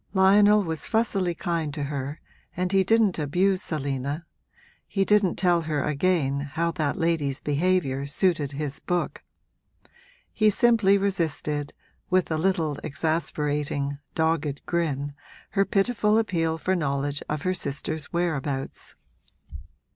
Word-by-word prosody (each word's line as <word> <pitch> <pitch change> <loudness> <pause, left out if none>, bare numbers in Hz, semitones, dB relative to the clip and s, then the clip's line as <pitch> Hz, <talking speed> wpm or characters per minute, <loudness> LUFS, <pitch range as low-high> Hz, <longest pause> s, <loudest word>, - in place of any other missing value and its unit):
Lionel 205 +2 +6
was 160 -4 -2
fussily 195 -6 +1
kind 165 -4 -2
to 150 - -3
her 140 +1 -4 0.4
and 180 0 0
he 195 -1 +4
didn't 215 -3 +3
abuse 180 +6 +1
Selina 140 +1 -3 0.6
he 195 -1 0
didn't 210 -3 +3
tell 175 -1 +2
her 155 -3 -1
again 150 -2 +1
how 170 +1 0
that 155 -3 -1
lady's 160 -6 0
behaviour 145 -3 0
suited 150 -2 0
his 140 -1 -4
book. 175 -1 -2 1.1
He 215 -1 +4
simply 210 -2 +4
resisted, 160 -7 -2 0.4
with 185 -2 +2
a 160 - +1
little 160 -5 0
exasperating, 145 -2 -1 0.2
dogged 160 -3 0
grin, 145 -5 -1 0.4
her 195 -1 +2
pitiful 210 +1 +2
appeal 165 -7 0
for 185 +4 0
knowledge 145 -3 -1
of 150 0 -2
her 185 - +1
sister's 150 -1 -3
whereabouts. 150 -6 -2
165 Hz, 125 wpm, -25 LUFS, 145-185 Hz, 1.1 s, Lionel